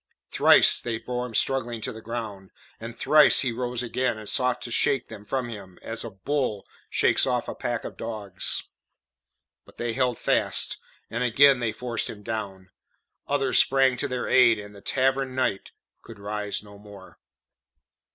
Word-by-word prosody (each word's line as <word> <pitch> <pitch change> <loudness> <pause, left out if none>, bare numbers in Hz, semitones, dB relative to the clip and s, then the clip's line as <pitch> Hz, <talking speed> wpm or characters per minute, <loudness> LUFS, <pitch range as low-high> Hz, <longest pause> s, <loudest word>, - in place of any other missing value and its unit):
Thrice - - +5
they 115 -2 -3
bore 125 +2 -4
him 115 - -10
struggling 120 -3 0
to 130 - -4
the 110 - -10
ground, 110 -5 -6 0.3
and 115 +1 -8
thrice 150 -1 +5
he 130 - 0
rose 125 0 -3
again 125 -1 -1
and 110 -1 -9
sought 125 +1 +2
to 120 - -7
shake 125 +2 +1
them 100 - -10
from 130 +2 -2
him 100 -6 -10
as 115 0 -3
a 115 - -6
bull 110 0 -2 0.2
shakes - - +3
off 125 -2 -1
a - - -4
pack 120 -1 -3
of - - -8
dogs. 105 -4 -3 1.0
But - - -20
they 120 -1 -2
held 125 -1 0
fast, - - +1 0.3
and 120 +2 -1
again 135 +2 +5
they 115 -2 -1
forced 120 0 -3
him 105 -2 -9
down; 100 -4 -6 0.6
others 135 -2 +2
sprang 135 -1 +4
to 145 - -2
their 125 -2 -3
aid, 120 -3 +5
and 105 0 -10
the 100 - -13
Tavern 135 +1 0
Knight 125 -7 -1 0.3
could 115 - -12
rise 105 0 -3
no 100 -1 -14
more. 100 -3 -14
115 Hz, 170 wpm, -25 LUFS, 105-125 Hz, 1.0 s, Thrice